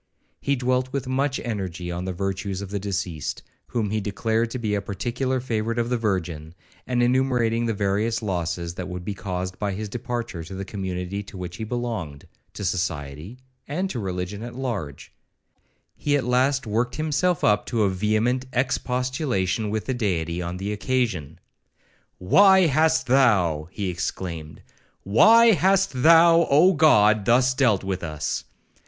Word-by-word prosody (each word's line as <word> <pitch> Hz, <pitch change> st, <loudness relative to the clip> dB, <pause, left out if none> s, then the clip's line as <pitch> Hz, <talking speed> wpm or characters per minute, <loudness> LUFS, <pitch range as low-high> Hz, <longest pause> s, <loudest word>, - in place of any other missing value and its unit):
He 140 Hz, -, 0 dB
dwelt 130 Hz, 0 st, 0 dB
with 140 Hz, -1 st, -3 dB
much 135 Hz, +1 st, 0 dB
energy 95 Hz, -6 st, -4 dB
on 90 Hz, +1 st, -4 dB
the 95 Hz, -, -2 dB
virtues 95 Hz, +1 st, -3 dB
of 100 Hz, -, -8 dB
the 100 Hz, -, -2 dB
deceased, 90 Hz, -5 st, -4 dB, 0.2 s
whom 110 Hz, -4 st, -2 dB
he 110 Hz, 0 st, 0 dB
declared 110 Hz, +3 st, -1 dB
to 125 Hz, -, -4 dB
be 110 Hz, -4 st, -2 dB
a 100 Hz, -, 0 dB
particular 120 Hz, +7 st, -2 dB
favourite 115 Hz, -2 st, -2 dB
of 120 Hz, +1 st, -1 dB
the 125 Hz, -, +2 dB
Virgin; 85 Hz, -7 st, -3 dB, 0.3 s
and 120 Hz, -1 st, +1 dB
enumerating 120 Hz, -2 st, +1 dB
the 115 Hz, -, -1 dB
various 105 Hz, +3 st, 0 dB
losses 85 Hz, -3 st, -2 dB
that 90 Hz, 0 st, -6 dB
would 90 Hz, -1 st, -6 dB
be 105 Hz, -, -3 dB
caused 90 Hz, -2 st, -5 dB
by 100 Hz, -2 st, -1 dB
his 105 Hz, +2 st, -5 dB
departure 120 Hz, -6 st, -4 dB
to 95 Hz, +3 st, -8 dB
the 95 Hz, +1 st, -5 dB
community 95 Hz, -1 st, -4 dB
to 100 Hz, -1 st, -11 dB
which 90 Hz, -1 st, -6 dB
he -, -, -5 dB
belonged, 110 Hz, -, -4 dB, 0.3 s
to 100 Hz, -, -5 dB
society, 85 Hz, -, -3 dB, 0.3 s
and 185 Hz, +7 st, -2 dB
to 125 Hz, -, -4 dB
religion 95 Hz, +1 st, -4 dB
at 120 Hz, +1 st, -7 dB
large; 110 Hz, -, -5 dB, 0.8 s
he 145 Hz, -1 st, +1 dB
at 135 Hz, -, -2 dB
last 130 Hz, +2 st, +1 dB
worked 115 Hz, +3 st, -1 dB
up -, -, -9 dB
himself 155 Hz, +3 st, 0 dB, 0.2 s
to 115 Hz, -4 st, 0 dB
a 100 Hz, -, +3 dB
vehement 110 Hz, +7 st, 0 dB
expostulation 125 Hz, -, -1 dB
with 110 Hz, 0 st, -2 dB
the 130 Hz, -, -1 dB
Deity 90 Hz, -7 st, -1 dB
on 90 Hz, +1 st, -4 dB
the 100 Hz, +3 st, -3 dB
occasion. 105 Hz, -, -1 dB, 0.8 s
'Why 190 Hz, -, +6 dB
hast 160 Hz, 0 st, +3 dB
thou,' 100 Hz, -, +3 dB
he 100 Hz, +1 st, -4 dB
exclaimed, 85 Hz, -3 st, -5 dB, 0.4 s
'why 225 Hz, -, +6 dB
hast 190 Hz, -, +2 dB
thou, 165 Hz, +2 st, +6 dB
Oh 165 Hz, +7 st, +6 dB
God! 110 Hz, -, +5 dB
thus 125 Hz, +2 st, +4 dB
dealt 125 Hz, -8 st, +2 dB
with 95 Hz, -1 st, -3 dB
us? 75 Hz, -3 st, -3 dB
110 Hz, 160 wpm, -24 LUFS, 90-130 Hz, 0.8 s, Why